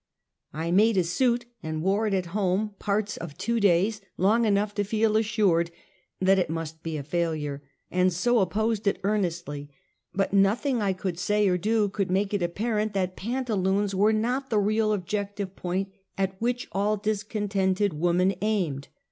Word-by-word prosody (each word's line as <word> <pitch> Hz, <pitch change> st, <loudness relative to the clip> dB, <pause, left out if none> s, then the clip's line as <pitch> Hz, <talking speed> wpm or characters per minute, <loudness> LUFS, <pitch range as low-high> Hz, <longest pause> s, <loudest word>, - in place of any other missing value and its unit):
I 160 Hz, +3 st, -3 dB
made 210 Hz, +3 st, +4 dB
a 185 Hz, -, +4 dB
suit 240 Hz, +8 st, +1 dB, 0.2 s
and 155 Hz, 0 st, -4 dB
wore 200 Hz, +4 st, +2 dB
it 200 Hz, -, +1 dB
at 185 Hz, -2 st, 0 dB
home 205 Hz, +1 st, 0 dB
j)arts 210 Hz, 0 st, -1 dB
of 160 Hz, -4 st, -8 dB
two 235 Hz, 0 st, 0 dB
days, 200 Hz, +2 st, +3 dB, 0.2 s
long 220 Hz, +5 st, +3 dB
enough 205 Hz, 0 st, +1 dB
to 205 Hz, -, 0 dB
feel 215 Hz, +1 st, +1 dB
assured 205 Hz, -6 st, +2 dB, 0.5 s
that 190 Hz, +1 st, +4 dB
it 180 Hz, -, 0 dB
must 160 Hz, 0 st, -5 dB
be 165 Hz, -2 st, -4 dB
a 145 Hz, -, -5 dB
failure; 155 Hz, -3 st, -2 dB, 0.3 s
and 180 Hz, 0 st, +3 dB
so 235 Hz, +8 st, +2 dB
opposed 215 Hz, +4 st, 0 dB
itearnestl}^, 175 Hz, -8 st, -1 dB, 0.4 s
but 195 Hz, 0 st, -1 dB
nothing 220 Hz, +6 st, +2 dB
I 195 Hz, -2 st, +1 dB
could 185 Hz, -2 st, -4 dB
say 210 Hz, +2 st, +2 dB
or 180 Hz, -1 st, +2 dB
do 215 Hz, +2 st, +2 dB
could 195 Hz, -1 st, -2 dB
make 195 Hz, +2 st, 0 dB
it 205 Hz, -, 0 dB
apparent 210 Hz, +4 st, -1 dB
that 185 Hz, -1 st, -1 dB
pantaloons 205 Hz, -4 st, 0 dB
were 205 Hz, +3 st, +4 dB
not 250 Hz, +5 st, 0 dB
the 220 Hz, -, +1 dB
real 215 Hz, +1 st, +2 dB
objective 200 Hz, 0 st, -3 dB
point, 190 Hz, +2 st, -2 dB, 0.3 s
at 190 Hz, -1 st, -1 dB
which 245 Hz, +1 st, -1 dB
all 205 Hz, +3 st, +1 dB
discontented 205 Hz, -2 st, 0 dB
woman 175 Hz, +4 st, +2 dB
aimed. 180 Hz, -11 st, -1 dB
200 Hz, 165 wpm, -26 LUFS, 180-215 Hz, 0.5 s, made